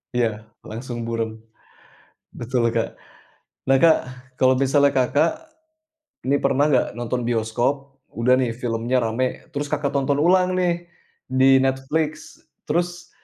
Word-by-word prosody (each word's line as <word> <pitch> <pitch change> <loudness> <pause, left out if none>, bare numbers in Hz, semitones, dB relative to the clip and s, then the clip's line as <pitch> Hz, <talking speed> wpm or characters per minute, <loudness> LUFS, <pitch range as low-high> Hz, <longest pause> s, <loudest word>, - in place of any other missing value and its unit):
Iya, 110 -2 -1 0.2
langsung 120 +1 -6
buram. 115 -1 -3 1.0
Betul, 120 -1 0
Kak. 115 -1 -2 0.7
Nah, 135 - +5
Kak, 160 +3 +6 0.4
kalau 130 0 +4
misalnya 140 +1 +3
Kakak 145 +6 +3 1.0
nih, 140 - +4
pernah 145 +3 +2
nggak 130 -3 +3
nonton 120 +1 -3
bioskop, 120 +4 -1 0.2
udah 125 +3 +3
nih 125 -3 0
filmnya 120 +1 -1
rame. 120 +3 -2
Terus 145 +1 -3
Kakak 145 -2 0
nonton 140 +1 +1
ulang 185 +2 +3
nih 175 -1 0 0.4
di 130 +1 +4
Netflix, 135 +4 -1 0.3
terus 175 +2 -2
130 Hz, 120 wpm, -22 LUFS, 120-145 Hz, 1.0 s, Kak